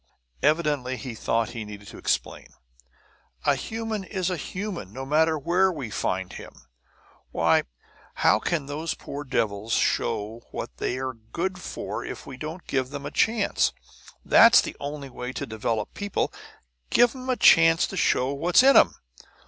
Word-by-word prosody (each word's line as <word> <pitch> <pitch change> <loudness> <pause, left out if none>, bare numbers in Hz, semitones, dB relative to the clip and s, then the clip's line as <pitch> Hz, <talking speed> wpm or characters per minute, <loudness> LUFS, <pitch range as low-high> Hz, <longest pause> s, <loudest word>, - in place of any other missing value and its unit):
Evidently 145 -4 +1
he 130 -3 -6
thought 115 0 0
he 115 -2 -5
needed 105 -1 -10
to - - -10
explain. - - -2 1.0
"A 145 - +5
human 220 +8 -4
is 185 -1 -2
a - - 0
human, 185 - -5
no 130 +4 -6
matter 160 +3 +2
where 180 +6 +2
we 135 -10 -6
find 95 -1 -2
him! - - -11 0.6
Why, - - +2 0.5
how - - +4
can 160 -5 -1
those 150 +3 -3
poor 145 +1 -7
devils 110 -4 -1
show 110 +3 0
what - - -6
they're 130 - -2
good 170 +12 -4
for 110 - -5
if - - -7
we 135 - -8
don't 155 +6 -7
give 130 -1 -1
'em 140 -1 -6
a 145 - -5
chance? 220 +3 +2 0.5
That's 235 +2 +8
the - - -2
only 140 -1 -6
way 125 +1 -6
to - - -4
develop 110 0 -3
people 205 -1 -2 0.6
give 240 -1 +4
'em 260 0 -7
a 255 - +1
chance 165 0 +6
to - - -7
show 135 -6 +2
what's 170 - +4
in 275 +1 +6
'em! - - +6
145 Hz, 160 wpm, -25 LUFS, 120-180 Hz, 1.0 s, That's